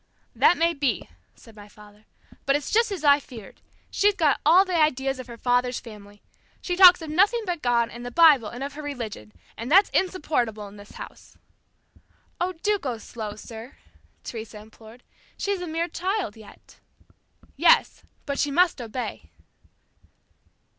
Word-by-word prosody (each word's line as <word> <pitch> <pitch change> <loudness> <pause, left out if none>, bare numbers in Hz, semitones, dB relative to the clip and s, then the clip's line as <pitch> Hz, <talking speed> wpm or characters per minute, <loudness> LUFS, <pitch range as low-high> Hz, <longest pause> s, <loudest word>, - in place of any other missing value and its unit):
"That 355 - +4
may 335 +1 +2
be," 280 -4 -2 0.3
said 225 -2 -18
my 205 -1 -13
father, 210 0 -18 0.4
"but 275 - +3
it's 290 - -3
just 460 0 +2
as 370 -6 -5
I 285 -1 +5
feared. 235 -7 -13 0.3
She's 410 0 +2
got 310 -7 +1
all 355 +6 +6
the 370 - -5
ideas 270 -3 0
of 255 - -8
her 235 -1 -10
father's 245 +1 0
family. 205 -3 -14 0.4
She 355 - -3
talks 360 -2 +8
of 310 - -6
nothing 405 +8 +2
but 350 -4 -3
God 235 -1 +1
and 240 +1 -9
the 245 - -5
Bible 285 -4 +5
and 245 +5 -7
of 280 0 -6
her 300 - -8
religion, 230 - -7 0.2
and 235 +5 -7
that's 385 +4 +5
insupportable 270 - -1
in 200 +1 -14
this 205 0 -14
house." - - -12 1.0
"Oh, 365 +1 -1
do 420 -1 +1
go 255 -7 -4
slow, 215 -1 -7
sir," 225 +3 -11 0.5
Teresa 225 -2 -8
implored. 220 +2 -15 0.3
"She's 400 -2 -2
a 355 - -5
mere 330 +2 -2
child 370 - -3
yet." 220 -2 -17 0.8
"Yes, - - +3 0.2
but 280 -1 -3
she 290 - +1
must 345 -1 +2
obey." 225 - -6
270 Hz, 165 wpm, -24 LUFS, 225-345 Hz, 1.0 s, talks